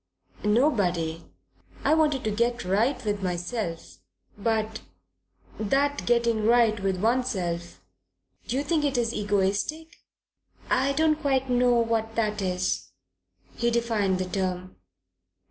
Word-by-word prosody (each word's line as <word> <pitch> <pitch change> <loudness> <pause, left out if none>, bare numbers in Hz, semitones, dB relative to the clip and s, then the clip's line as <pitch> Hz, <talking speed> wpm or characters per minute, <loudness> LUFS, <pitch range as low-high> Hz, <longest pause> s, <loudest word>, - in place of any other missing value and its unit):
"Nobody. 195 - +1 0.6
I 290 - +3
wanted 300 -4 +2
to 215 - 0
get 235 +2 0
right 230 +7 +1
with 205 -1 -1
myself. 175 - -4 0.4
But 220 0 -1 0.8
that 275 +7 0
getting 235 -2 +2
right 230 -2 +4
with 190 -1 -1
oneself 180 - -1 0.6
do 245 - -2
you 280 - 0
think 305 0 0
it 280 -3 0
egotistic?" 225 - -1 0.7
"I 270 +2 +2
don't 310 +1 +2
quite 270 -3 +1
know 245 0 +4
what 225 -1 0
that 215 -2 0
is." 185 -1 -1 0.7
He 235 - +1
defined 225 -5 +1
the 185 - -2
term. 185 0 -3
225 Hz, 115 wpm, -26 LUFS, 190-250 Hz, 0.8 s, right